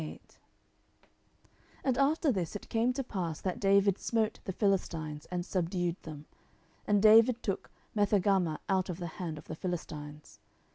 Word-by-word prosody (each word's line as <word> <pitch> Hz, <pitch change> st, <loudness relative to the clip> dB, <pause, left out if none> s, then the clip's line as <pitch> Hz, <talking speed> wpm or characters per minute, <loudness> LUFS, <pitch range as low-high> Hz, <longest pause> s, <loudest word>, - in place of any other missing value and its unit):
10:008:001 -, -, -7 dB, 1.6 s
And 260 Hz, -3 st, +1 dB
after 295 Hz, +2 st, +3 dB
this 185 Hz, -6 st, -2 dB
it 205 Hz, -, -7 dB
came 230 Hz, +2 st, +2 dB
to 270 Hz, +1 st, -2 dB
pass 175 Hz, -9 st, -3 dB
that 190 Hz, +5 st, -2 dB
David 200 Hz, -1 st, +3 dB
smote 225 Hz, -2 st, 0 dB
the -, -, -2 dB
Philistines, 165 Hz, -7 st, -1 dB
and 180 Hz, -1 st, -3 dB
subdued 175 Hz, -2 st, -1 dB
them: 150 Hz, -2 st, -9 dB, 0.6 s
and 205 Hz, -1 st, +3 dB
David 225 Hz, +2 st, +6 dB
took 195 Hz, -, -3 dB, 0.3 s
Methegammah 195 Hz, -5 st, +2 dB
out 190 Hz, -2 st, +1 dB
of 175 Hz, -, -3 dB
the 175 Hz, -, -5 dB, 0.2 s
hand 165 Hz, -4 st, -3 dB
of -, -, -11 dB
the -, -, -6 dB
Philistines. 150 Hz, -4 st, -6 dB
190 Hz, 150 wpm, -31 LUFS, 170-215 Hz, 1.6 s, David